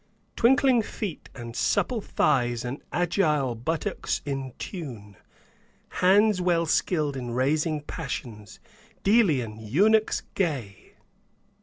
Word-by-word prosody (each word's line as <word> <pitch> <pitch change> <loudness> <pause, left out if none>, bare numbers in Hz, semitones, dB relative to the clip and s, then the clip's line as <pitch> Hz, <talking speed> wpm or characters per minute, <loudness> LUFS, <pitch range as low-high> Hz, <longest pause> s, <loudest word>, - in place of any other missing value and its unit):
Twinkling 255 0 +4
feet 205 -5 -6
and 120 -2 -8
supple 240 -4 +1
thighs 120 -9 +1
and 125 +4 -5
agile 155 -7 +1
buttocks 140 +8 -3
in 135 -3 -4
tune, 120 - -7 0.7
Hands 200 +1 +3
well 170 -2 +2
skilled 155 -3 0
in 125 -2 -5
raising 150 +5 0
passions, 120 -9 -7 0.4
Delian 155 - +3
eunuchs 205 - +2
gay!" 135 - -3
150 Hz, 100 wpm, -26 LUFS, 120-185 Hz, 0.7 s, Twinkling